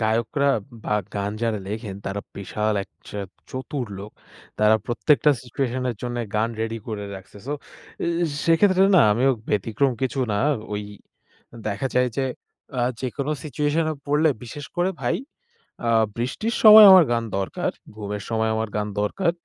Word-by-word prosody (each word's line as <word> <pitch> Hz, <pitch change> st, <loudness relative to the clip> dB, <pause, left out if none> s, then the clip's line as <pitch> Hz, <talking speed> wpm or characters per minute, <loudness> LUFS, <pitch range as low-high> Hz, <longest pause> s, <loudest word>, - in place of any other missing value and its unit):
গায়করা 115 Hz, +6 st, +1 dB, 0.4 s
বা -, -, -1 dB, 0.2 s
গান 100 Hz, 0 st, -1 dB
যারা 110 Hz, -2 st, 0 dB
লেখেন 105 Hz, -2 st, -5 dB
তারা 100 Hz, +1 st, -3 dB, 0.2 s
বিশাল 105 Hz, +2 st, -1 dB
এক -, -, -13 dB, 0.2 s
চেত 100 Hz, -2 st, -6 dB, 0.2 s
চতুর 130 Hz, -1 st, -4 dB
লোক। 105 Hz, +2 st, -8 dB, 0.5 s
তারা 105 Hz, +1 st, +5 dB
প্রত্যেকটা 150 Hz, +5 st, +3 dB
সিচুয়েশনের 125 Hz, -1 st, -2 dB
জন্য 120 Hz, 0 st, -3 dB, 0.2 s
গান 110 Hz, +2 st, +2 dB
রেডি 115 Hz, 0 st, -2 dB
করে 105 Hz, -2 st, -4 dB
রাখছে, 95 Hz, +2 st, -12 dB
সো 145 Hz, -, -2 dB, 0.5 s
এ -, -, -1 dB, 0.4 s
সেক্ষেত্রে 185 Hz, +3 st, +4 dB
না -, -, +8 dB
আমিও 130 Hz, +5 st, +3 dB, 0.2 s
ব্যতিক্রম 115 Hz, +6 st, +1 dB
কিছু 130 Hz, +1 st, -1 dB
না -, -, 0 dB, 0.4 s
ওই 105 Hz, 0 st, -2 dB, 0.9 s
দেখা 105 Hz, +6 st, -2 dB
যায় 125 Hz, 0 st, +3 dB
যে 135 Hz, -, +1 dB, 0.6 s
আ -, -, +2 dB, 0.2 s
যেকোনো 135 Hz, +3 st, -3 dB
সিচুয়েশন 150 Hz, +3 st, 0 dB
এ -, -, -5 dB
পড়লে 150 Hz, +2 st, +3 dB, 0.2 s
বিশেষ 145 Hz, +4 st, -8 dB
করে 180 Hz, +2 st, +2 dB
ভাই, 120 Hz, -2 st, 0 dB, 0.7 s
আ 115 Hz, -, +1 dB, 0.3 s
বৃষ্টির 135 Hz, -, -2 dB
সময় 215 Hz, -1 st, +11 dB
আমার 185 Hz, -2 st, +9 dB
গান 115 Hz, -1 st, +1 dB
দরকার, 95 Hz, -, -2 dB, 0.2 s
ঘুমের 105 Hz, -1 st, -5 dB
সময় 110 Hz, -1 st, +1 dB
আমার 110 Hz, 0 st, -2 dB
গান 105 Hz, 0 st, -1 dB
দরকার। 170 Hz, -, 0 dB
120 Hz, 155 wpm, -23 LUFS, 105-145 Hz, 0.9 s, সময়